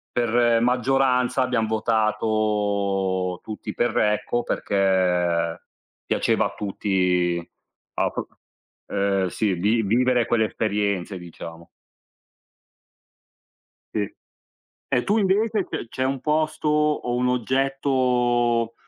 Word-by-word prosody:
per 120 -1 +3
maggioranza 125 +1 +2
abbiam 125 -3 0
votato 105 -4 0
tutti 110 -1 -7
per 120 -1 0
Recco 110 +3 0
perché 90 -4 +1 0.4
piaceva - - +1
a - - -11
tutti 90 -4 0 0.5
a - - 0
prop - - -5 0.6
ehm, 100 -1 0
sì. 100 0 0
Lì 105 +6 +1
vivere 125 +3 +2
quelle 110 -2 +2
esperienze 100 -3 -2
diciamo. 85 -1 -10 2.3
Sì. 105 -2 -1 0.8
E 125 - +1
tu 210 +3 +1
invece 205 +1 +1
c 120 - -5
c'è 130 +2 -3
un 135 0 -1
posto 155 +1 -1
o 150 -5 +1
un 125 0 +1
oggetto, 125 -2 +1
110 Hz, 100 wpm, -23 LUFS, 100-125 Hz, 2.3 s, per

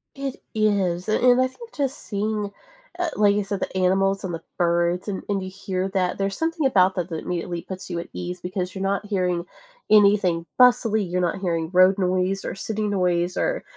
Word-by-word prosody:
It 275 -1 -4 0.2
is, 195 -4 +1
an 215 - +1
and 250 0 +6
I 255 - +3
think 460 - -13
just 275 -2 -1
seeing, 210 0 -2 0.5
eh, 355 -2 0
like 205 -1 +4
you 205 - +1
said, 195 0 -3
the 190 - -4
animals, 195 +1 +2
and 180 -2 -3
the 165 - -6
birds, 175 +2 +1
and 195 -2 -3
and 195 -2 0
you 185 - -5
hear 190 0 -3
that, 185 -2 0
there's 195 0 -1
something 325 -2 -1
about 190 -7 +4
that 180 0 -2
that 160 - -3
immediately 175 -1 -3
puts 185 0 -8
you 170 -1 -3
at - - -7
ease 180 0 -5
because 180 0 -3
you're 190 - -6
not 200 +1 -1
hearing 180 -4 -1 0.4
anything 200 -5 +4
bustily, 235 -4 +5
you're 180 0 0
not 175 +2 -1
hearing 165 -4 -1
road 185 +1 +5
noise, 185 +1 0
or - - -4
city 215 +1 -2
noise, 180 -3 0
or - - 0
190 Hz, 205 wpm, -23 LUFS, 180-210 Hz, 0.5 s, and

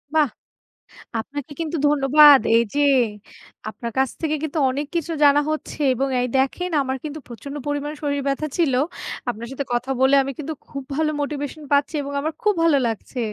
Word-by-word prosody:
বাহ! 300 -5 +4 0.9
আপনাকে 290 +5 -6
কিন্তু 325 0 -2
ধন্যবাদ। 290 0 +7 0.2
এই 230 - +5
যে, 290 - +1 0.9
আপনার 235 +2 -6
কাছ 265 -1 +3
থেকে 310 -1 0
কিন্তু 315 +1 -3
অনেক 280 +3 -3
কিছু 335 0 -1
জানা 285 0 +6
হচ্ছে 310 - -5
এবং 270 +3 -1
এই 250 - 0
দেখেন 275 +7 0
আমার 265 0 -2
কিন্তু 305 0 -6
প্রচন্ড 275 +4 -8
পরিমাণ 290 +1 -2
শরীর 285 -1 -1
ব্যথা 275 +2 -1
ছিল। 310 -7 +2 0.6
আপনার 235 0 -5
সাথে 275 0 -4
কথা 245 +2 -1
বলে 265 +1 +5
আমি 275 - -4
কিন্তু 310 +1 -4 0.2
খুব 275 -1 -6
ভালো 310 0 +1
motivation 290 +1 -4
পাচ্ছি 285 +2 +2
এবং 280 0 -6
আমার 315 +2 -2
খুব 420 -1 +4
ভালো 320 -4 +4
লাগছে। 230 +3 -5
285 Hz, 175 wpm, -22 LUFS, 270-305 Hz, 0.9 s, ধন্যবাদ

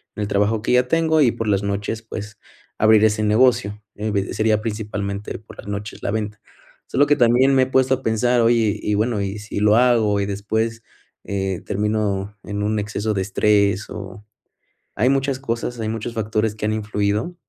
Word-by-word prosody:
en - - -5
el 105 - -1
trabajo 105 +2 +1
que 120 - 0
ya 125 0 +3
tengo 160 +1 +2
y 125 -5 +5
por 115 - -4
las 100 -1 +1
noches, 100 +2 -3
pues 105 -2 -8 0.4
abrir 110 0 +5
ese 110 0 +1
negocio. 110 -1 +2
Evi 100 -2 -2
sería 110 -1 +1
principalmente 105 -2 -4
por 110 - -15
las - - -11
noches 100 0 -6
la - - -1
venta. 105 -1 -3 0.5
Solo 145 +2 +2
que 145 - +4
también 125 +2 +4
me 130 - +5
he - - +1
puesto 130 0 +3
a 130 - -11
pensar, 120 +2 +2
oye, 115 -3 +2
y 105 - -1
bueno, 110 +1 0
¿y 100 +1 -3
si 105 0 -5
lo 105 +1 +4
hago 115 -4 +3
y 100 - 0
después, 110 +3 -2 0.4
eh, 95 -2 -3
termino 105 -1 -1
en 100 0 -4
un 105 +1 0
exceso 105 +1 -2
de 95 - 0
estrés?, 100 0 +1
o 105 0 -8 0.7
Hay 120 +5 +3
muchas 135 0 +1
cosas, 120 -2 -4
hay 110 - -2
muchos 110 +1 -4
factores 110 -1 -1
que 105 0 -3
han 110 - 0
influido. 105 - -1
110 Hz, 190 wpm, -21 LUFS, 105-115 Hz, 0.7 s, y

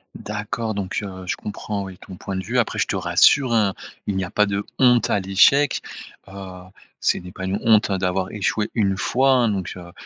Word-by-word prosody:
D'accord! 110 +1 -4
Donc, 100 -1 -2
heu, 95 -2 -8
je 90 - -2
comprends, 105 -1 -5
oui, 95 -2 -10
ton 95 -2 -11
point 95 +1 -5
de 95 - -3
vue. - - 0
Après, - - -1
je - - +2
te - - -3
rassure, 135 -3 +4
hein, 105 -4 +2 0.3
il 100 - -2
n'y 95 - -1
a 90 - -5
pas 105 - +2
de 100 0 -2
honte 125 -2 +4
à 100 - +2
l'échec. 115 +10 +3 0.5
Heu, 95 -2 -9 0.4
c'est - - +1
n'est 90 0 -10
pas 95 +1 -6
une 95 +1 -1
honte 110 -2 +4
hein, 95 - 0
d'avoir 95 0 -1
échoué 105 +1 -1
1 100 -4 +1
fois, 130 +7 +2
hein, 125 -4 +3
donc 95 -3 -3
heu, 85 -1 -11
100 Hz, 220 wpm, -22 LUFS, 95-110 Hz, 0.5 s, rassure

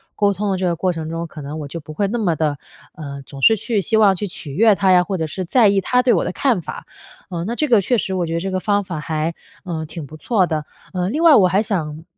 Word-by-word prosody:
沟 205 -1 +2
通 205 +2 -2
的 190 - +1
这 185 - -1
个 175 -1 +1
过 180 +1 0
程 160 -1 -5
中， 165 +1 -4
可 155 - -10
能 145 +2 -6
我 150 - -6
就 165 +4 -6
不 155 +1 -10
会 200 +5 0
那 230 +5 -2
么 200 -7 +1
的， 150 -3 0 0.4
呃， 140 -4 -8
总 135 0 -10
是 225 +9 +6
去 210 0 -1
希 220 - +1
望 205 -3 +5
去 195 - -3
取 150 -5 -7
悦 215 +7 +5
她 190 -1 +2
呀， 180 - +5
或 190 +1 -3
者 160 -2 -2
是 185 +4 -4
在 225 +5 +4
意 200 -1 +3
她 250 +6 +2
对 250 -1 +3
我 - - +2
的 180 - -2
看 235 -4 +1
法。 - - -8 0.4
呃， 170 -2 -4
那 235 +4 -3
这 305 - +1
个 230 -6 +4
确 245 +6 +1
实 190 -2 -2
我 180 -2 0
觉 165 - -4
得 165 - 0
这 190 +3 -3
个 185 - -1
方 205 -1 +1
法 170 -5 -5
还， 155 +2 -2 0.3
呃， 160 -3 -4
挺 155 -1 -7
不 155 - -11
错 190 +1 +1
的。 155 -2 -2 0.3
呃， 180 0 -1
另 300 +9 -2
外 330 -3 +7
我 185 - +6
还 195 +4 +2
想 160 -7 -3
185 Hz, 315 characters per minute, -20 LUFS, 160-205 Hz, 0.4 s, 外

